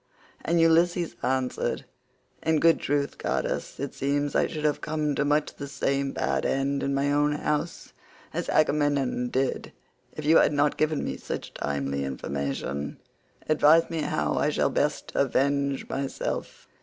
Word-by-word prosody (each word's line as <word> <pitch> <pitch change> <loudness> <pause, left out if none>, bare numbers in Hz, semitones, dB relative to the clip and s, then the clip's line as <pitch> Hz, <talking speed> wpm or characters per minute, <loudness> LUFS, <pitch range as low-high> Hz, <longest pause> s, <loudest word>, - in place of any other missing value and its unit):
And 170 +1 +1
Ulysses 170 +1 +3
answered, 130 -1 -1 0.6
"In 160 -1 +2
good 165 +1 +5
truth, 145 0 -1
goddess, - - -2
it 140 0 -4
seems 145 +1 -1
I - - +3
should 155 -1 -4
have 150 -1 +1
come 150 -1 -1
to 145 - 0
much 145 +1 +1
the 140 - -7
same 135 0 -1
bad - - -1
end 140 +1 0
in 140 0 0
my 140 +1 +1
own 145 +1 +2
house 150 +3 -2 0.4
as - - -3
Agamemnon 145 -5 +1
did, 130 +1 -1 0.4
if 155 - -7
you 160 +2 +6
had - - +4
not 145 0 +2
given 155 -1 0
me - - -3
such - - -6
timely 70 -1 -2
information. 70 +1 -3 0.5
Advise 155 +2 +5
me 165 -1 -1
how 75 - 0
I - - +2
shall - - +1
best - - -1
avenge 140 0 +1
myself. 135 0 -4
145 Hz, 155 wpm, -26 LUFS, 135-155 Hz, 0.6 s, you